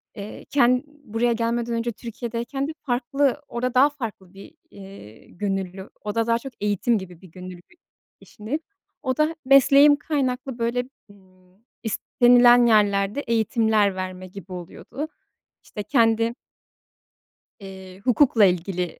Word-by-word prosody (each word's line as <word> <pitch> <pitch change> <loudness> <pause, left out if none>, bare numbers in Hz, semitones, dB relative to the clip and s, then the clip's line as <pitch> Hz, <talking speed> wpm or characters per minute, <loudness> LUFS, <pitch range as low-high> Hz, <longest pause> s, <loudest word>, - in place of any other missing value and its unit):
Eee, 205 0 -9
ken 250 -2 +2
buraya 240 -5 -2
gelmeden 235 +1 -1
önce 230 +1 -1
Türkiye'deyken 235 +4 -5
de - - -4
farklı, 275 +2 0
orada 250 +1 -3
daha 270 +3 +5
farklı 220 -9 -8
bir, 195 0 -13 0.2
iii, 190 - -14
gönüllü, 195 -1 -4
orada 220 +2 -2
daha 230 0 +2
çok 265 +1 -9
eğitim 210 +3 +1
gibi 180 -4 -9
bir 190 - -14
gönüllü 180 -1 -10 0.6
işindeydim. 265 +10 -6 0.4
O 260 -2 -1
da 310 +2 +1
mesleğim 275 +2 +6
kaynaklı 270 -4 -3
böyle, 245 +2 -1 0.2
ımm, 185 -1 -24 0.3
istenilen 245 +2 +4
yerlerde 205 +1 +2
eğitimler 220 -4 +1
verme 185 0 -6
gibi 190 0 -12
oluyordu. 185 - -7 0.6
İşte 210 - -7
kendi 230 -1 +2 1.3
eee, 190 -1 -11
hukukla 245 -4 +4
ilgili 180 -1 -2
230 Hz, 125 wpm, -23 LUFS, 195-250 Hz, 1.3 s, mesleğim